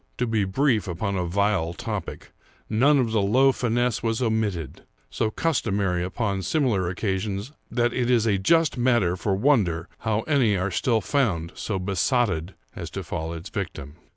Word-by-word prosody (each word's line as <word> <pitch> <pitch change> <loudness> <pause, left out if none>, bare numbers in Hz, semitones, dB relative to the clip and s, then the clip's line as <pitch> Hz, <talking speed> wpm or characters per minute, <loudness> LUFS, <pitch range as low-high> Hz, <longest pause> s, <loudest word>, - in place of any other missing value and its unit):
To 125 - 0
be 110 -4 +1
brief 110 +1 +1
upon 100 +3 -2
a 90 -1 -1
vile 95 -2 +1
topic, - - -5 0.4
none 135 +7 +4
of 120 -4 +1
the 110 -2 +2
low 130 +7 +4
finesse 120 -1 0
was 115 -1 -1
omitted, 110 - -1 0.3
so 110 - 0
customary 100 - 0
upon 100 +1 -2
similar 100 - +1
occasions 100 +4 -3 0.2
that 120 -1 +1
it 125 -1 0
is 120 -3 +3
a 100 -4 +2
just 165 - +2
matter 120 -8 +2
for 95 +1 -1
wonder 95 - +2
how 110 -1 0
any 125 -8 +2
are 95 +2 -1
still 115 +4 +1
found 95 - 0
so 105 - -3
besotted 95 - 0 0.2
as - - -6
to - - -5
fall 80 +1 -4
its 85 +2 -7
victim. 75 -7 -5
105 Hz, 165 wpm, -25 LUFS, 95-120 Hz, 0.4 s, none